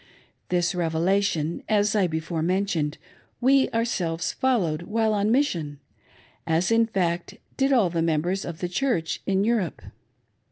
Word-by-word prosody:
This 175 +1 +1
rev^ation, 170 0 0
as 210 0 +2
I 195 -4 +3
before 160 0 -3
mentioned, 170 -4 0 0.4
we 265 +2 +4
ourselves 180 -8 -1
followed 185 -12 0
while 220 +4 0
on 205 0 +1
mission, 170 - 0 0.7
as, 165 +5 +1
in 230 0 +4
f^ct, 175 -5 -2 0.2
did 270 0 +1
all 220 -10 +3
the 165 -1 0
members 170 +4 0
of 170 -2 -7
the 180 - -1
Church 180 -4 -1
in 195 0 +2
Jwrepe. 215 -7 -1
185 Hz, 135 wpm, -25 LUFS, 165-220 Hz, 0.7 s, we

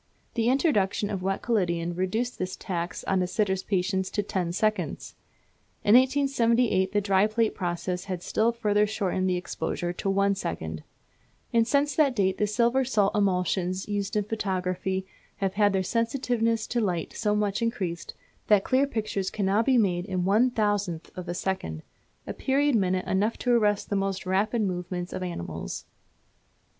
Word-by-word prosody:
The 230 0 +1
introduction 210 - +1
of 195 -3 -3
wet 195 +1 -2
collodion 175 -7 0
reduced 200 +8 -2
this 185 0 -3
tax 175 -1 -4
on 190 -1 +1
a 180 - 0
sitter's 190 -1 0
patience 190 0 -1
to 205 - -1
ten 185 -4 -2
seconds. 215 +4 -1 0.7
In 205 - +4
1878 245 -6 +3
the 205 - +2
dry 195 0 +3
plate 220 0 +1
process 180 0 -3
had 185 -3 -4
still 225 +2 +2
further 210 -2 +1
shortened 190 -3 -1
the 180 - +1
exposure 175 0 -3
to 195 - -3
one 200 +1 +3
second; 80 - -4 0.7
and 230 -1 +4
since 285 0 +2
that 285 -5 +3
date 190 -3 +1
the 210 - +2
silver 235 +5 +2
salt 215 -6 +1
emulsions 185 -1 0
used 205 +1 -2
in 210 - +2
photography 190 -2 -2 0.3
have 195 -1 -1
had 205 -1 +3
their 190 -1 +1
sensitiveness 230 0 0
to 240 - -1
light 180 -6 -2
so 210 -2 0
much 210 +1 0
increased, 190 -7 -3 0.3
that 205 -2 +5
clear 270 +2 +2
pictures 215 -6 -2
can 205 - -2
now 200 +3 +3
be 255 +2 +3
made 180 -5 +1
in 185 -3 -2
one 215 +6 +4
thousandth 205 -7 -1
of 180 -1 -7
a 175 - -2
second, 80 - -3 0.4
a - - -4
period 280 +2 +1
minute 185 -3 +1
enough 205 +4 0
to 245 - 0
arrest 210 -3 +1
the - - +1
most 195 -1 -1
rapid 210 +5 +1
movements 180 -1 -3
of - - -4
animals. 175 - -5
200 Hz, 170 wpm, -27 LUFS, 185-225 Hz, 0.7 s, that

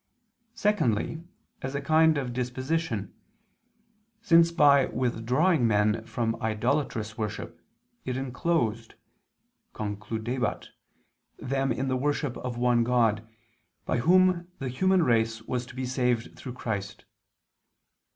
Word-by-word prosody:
Secondly, 160 - 0 0.4
as 135 +2 -4
a - - 0
kind 155 +2 +4
of 130 -3 -3
disposition, 125 - -2 1.1
since 170 -6 +5
by 145 -4 +5
withdrawing 125 +5 +1
men 105 +1 +2
from 115 0 -2
idolatrous 110 0 -1
worship, 105 -2 -5 0.4
it 130 0 -3
enclosed 130 -4 -1 0.8
(concludebat) 110 +4 -3 0.7
them 135 0 -1
in 130 +3 -1
the 130 -1 0
worship 145 -1 -1
of 125 -1 -5
one 120 -1 +3
God, 115 -3 +1 0.6
by - - 0
Whom 180 +4 +4
the 135 - -4
human 185 +7 +2
race 115 -3 +1
was 125 +1 -3
to - - -12
be 130 0 -3
saved 125 -2 -1
through 125 - -8
Christ. 100 -5 -5
125 Hz, 110 wpm, -27 LUFS, 115-145 Hz, 1.1 s, since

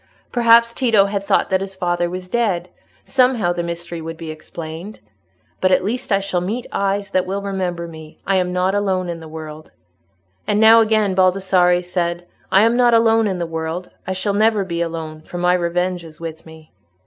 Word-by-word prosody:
Perhaps 235 -1 +5
Tito 225 -7 +3
had 200 0 -2
thought 200 - +1
that 190 0 +2
his 195 0 -5
father 175 -1 -1
was 180 +1 -6
dead; 185 -5 -1 0.3
somehow 250 -9 +2
the 175 - -2
mystery 170 0 -5
would 165 0 -7
be 160 -1 -6
explained. 160 +5 -8 0.6
"But 185 - +2
at 185 - +3
least 230 +4 -3
I 195 - +4
shall 195 -3 -2
meet 220 +7 -3
eyes 200 0 -1
that 185 -1 +1
will 200 +1 -3
remember 180 -3 -3
me. 160 -1 -12
I 195 -1 +2
am 180 -1 0
not 180 +1 +1
alone 190 -3 0
in 170 -1 -4
the 160 - -10
world." 155 0 -9 0.8
And 210 - +1
now 225 +1 +8
again 215 -3 +2
Baldassarre 185 -1 +3
said, 175 -1 -2 0.3
"I 195 - +6
am 230 +1 +3
not 240 -1 +4
alone 225 -1 +4
in 190 -2 -2
the 175 - -2
world; 165 +2 -5 0.2
I 190 - -1
shall 195 +2 -1
never 215 0 +2
be 170 -2 -3
alone, 160 -2 -4
for 175 - -8
my 180 0 +2
revenge 180 0 -1
is 160 -1 -13
with 165 -1 -8
me." 160 -1 -15
185 Hz, 195 wpm, -20 LUFS, 170-200 Hz, 0.8 s, now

